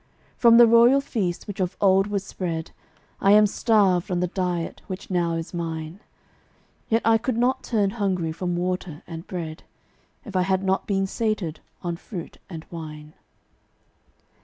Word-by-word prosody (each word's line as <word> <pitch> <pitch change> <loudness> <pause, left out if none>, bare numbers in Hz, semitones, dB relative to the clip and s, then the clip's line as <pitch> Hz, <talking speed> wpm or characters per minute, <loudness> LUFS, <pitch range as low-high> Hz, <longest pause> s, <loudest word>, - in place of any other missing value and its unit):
From 230 -1 +6
the 240 - +9
royal 235 +4 +6
feast 205 -10 -2
which 205 -2 -7
of 185 0 -1
old 195 0 +4
was 200 -2 -2
spread 165 -4 -4 0.5
I 195 +1 +5
am 210 0 +7
starved 200 -4 +2
on 180 -1 0
the 180 - +1
diet 180 -2 -3
which 190 0 -7
now 170 -2 +1
is 165 +1 -4
mine; 165 0 -4 0.9
Yet 225 +1 +2
I 225 0 +5
could 240 0 -2
not 250 +2 +1
turn 205 -4 0
hungry 190 -7 -1
from 175 +2 -3
water 180 -3 -3
and 165 0 -8
bread, 165 -4 -5 0.6
If 205 -5 -9
I 185 - +3
had 190 +1 +1
not 190 0 0
been 195 -1 +1
sated 205 -6 -2 0.2
on 170 -1 -2
fruit 175 -2 -8
and 165 -3 -8
wine. 155 -2 -8
185 Hz, 160 wpm, -24 LUFS, 170-210 Hz, 0.9 s, the